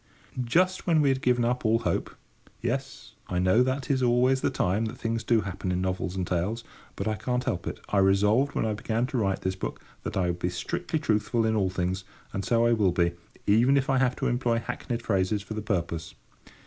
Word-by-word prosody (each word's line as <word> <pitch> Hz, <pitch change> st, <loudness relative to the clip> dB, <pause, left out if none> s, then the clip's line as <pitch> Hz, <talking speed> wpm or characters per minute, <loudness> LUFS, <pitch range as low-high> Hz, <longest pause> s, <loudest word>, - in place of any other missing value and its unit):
Just 185 Hz, +11 st, +1 dB
when 165 Hz, -3 st, +4 dB
we 145 Hz, -2 st, +4 dB
had 135 Hz, 0 st, +1 dB
given 125 Hz, -1 st, +2 dB
up 125 Hz, +1 st, 0 dB
all 110 Hz, 0 st, +3 dB
hope—yes, -, -, -5 dB
I 90 Hz, -, -2 dB
know 95 Hz, +6 st, +4 dB
that 130 Hz, +2 st, 0 dB
is 130 Hz, -1 st, +1 dB
always 125 Hz, +2 st, +3 dB
the -, -, +2 dB
time 95 Hz, +5 st, 0 dB
that 110 Hz, -, -5 dB
things 115 Hz, 0 st, -2 dB
do 115 Hz, -1 st, +3 dB
happen 95 Hz, -1 st, -4 dB
in 90 Hz, -, 0 dB
novels 95 Hz, 0 st, -2 dB
and 95 Hz, -1 st, -1 dB
tales; 95 Hz, +7 st, -1 dB, 0.3 s
but 100 Hz, -, -3 dB
I 110 Hz, -, +1 dB
can't 125 Hz, +4 st, -1 dB
help -, -, -2 dB
it. -, -, -4 dB
I 100 Hz, -, +2 dB
resolved, 105 Hz, +8 st, +3 dB
when -, -, +1 dB
I 110 Hz, -, 0 dB
began 110 Hz, +3 st, -1 dB
to 130 Hz, 0 st, -3 dB
write 95 Hz, -3 st, 0 dB
this 95 Hz, 0 st, -1 dB
book, 95 Hz, -, -5 dB, 0.2 s
that -, -, -4 dB
I 95 Hz, -, +2 dB
would 90 Hz, 0 st, -1 dB
be 90 Hz, -, 0 dB
strictly 160 Hz, -, -3 dB
truthful 115 Hz, -4 st, +1 dB
in 110 Hz, 0 st, +1 dB
all 100 Hz, -3 st, +2 dB
things; 95 Hz, +1 st, -2 dB, 0.3 s
and 95 Hz, -, -2 dB
so 115 Hz, +3 st, +2 dB
I 120 Hz, -, +4 dB
will 105 Hz, -5 st, +3 dB
be, 85 Hz, -1 st, +2 dB, 0.3 s
even 120 Hz, +7 st, +4 dB
if 135 Hz, 0 st, +1 dB
I 135 Hz, -, +3 dB
have 125 Hz, -1 st, +2 dB
to -, -, -3 dB
employ 120 Hz, -1 st, +1 dB
hackneyed 120 Hz, 0 st, -4 dB
phrases 100 Hz, 0 st, 0 dB
for 110 Hz, -, -7 dB
the 110 Hz, -, -3 dB
purpose. 85 Hz, -5 st, -3 dB
110 Hz, 225 wpm, -27 LUFS, 95-125 Hz, 0.3 s, when